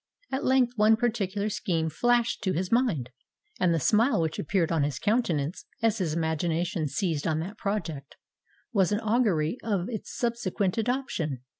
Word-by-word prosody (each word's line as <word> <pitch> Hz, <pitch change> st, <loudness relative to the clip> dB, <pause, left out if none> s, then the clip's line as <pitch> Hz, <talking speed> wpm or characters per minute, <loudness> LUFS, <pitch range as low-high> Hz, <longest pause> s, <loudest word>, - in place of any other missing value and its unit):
At 265 Hz, -, -1 dB
length 255 Hz, -2 st, +3 dB
one 215 Hz, +1 st, +6 dB
particular 210 Hz, -4 st, -1 dB
scheme 165 Hz, -6 st, -1 dB
flashed 240 Hz, +7 st, +1 dB
to 190 Hz, -3 st, +1 dB
his 180 Hz, +2 st, -2 dB
mind; 210 Hz, -, +1 dB, 0.5 s
and 180 Hz, -, +3 dB
the 165 Hz, -, +2 dB
smile 225 Hz, -, +3 dB
which 160 Hz, -1 st, -1 dB
appeared 170 Hz, 0 st, 0 dB
on 165 Hz, -2 st, +2 dB
his 140 Hz, -2 st, -1 dB
countenance, 175 Hz, -, 0 dB, 0.2 s
as 225 Hz, -1 st, +2 dB
his 165 Hz, -5 st, -1 dB
imagination 165 Hz, +2 st, -1 dB
seized 150 Hz, +1 st, -1 dB
on 160 Hz, -1 st, +1 dB
that 200 Hz, +6 st, -7 dB
project, 170 Hz, -10 st, -3 dB, 0.6 s
was 195 Hz, -4 st, +3 dB
an 210 Hz, -, +1 dB
augury 215 Hz, -5 st, +1 dB
of 200 Hz, -3 st, -1 dB
its 220 Hz, -4 st, -5 dB
subsequent 230 Hz, -5 st, -1 dB
adoption. 215 Hz, -, -2 dB
190 Hz, 160 wpm, -27 LUFS, 160-230 Hz, 0.6 s, one